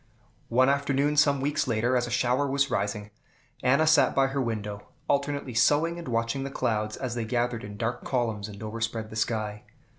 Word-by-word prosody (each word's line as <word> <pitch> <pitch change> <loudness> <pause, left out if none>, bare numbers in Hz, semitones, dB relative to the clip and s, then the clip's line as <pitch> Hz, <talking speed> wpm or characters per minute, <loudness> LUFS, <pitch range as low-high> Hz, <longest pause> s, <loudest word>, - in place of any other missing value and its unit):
One 130 +2 +4
afternoon, 140 +1 +1
some 145 -2 +4
weeks 145 0 0
later, 120 +2 +1
as 120 -1 +1
a - - -5
shower 125 +3 +1
was 140 0 +1
rising, 105 +1 -2 0.5
Anna 140 +5 +3
sat 155 -2 +4
by 135 - +4
her 135 0 -1
window, 105 -4 -4 0.2
alternately 140 -2 -1
sewing 150 +8 +3
and 170 - -8
watching 115 +3 -1
the 135 - -4
clouds 110 -5 -1
as 130 -3 -3
they 120 -1 -2
gathered 120 0 -1
in 105 0 -8
dark 115 +3 -2
columns 115 -5 -1
and 105 0 -9
overspread 110 0 -3
the - - -8
sky. 110 -2 -2
120 Hz, 185 wpm, -27 LUFS, 110-140 Hz, 0.5 s, One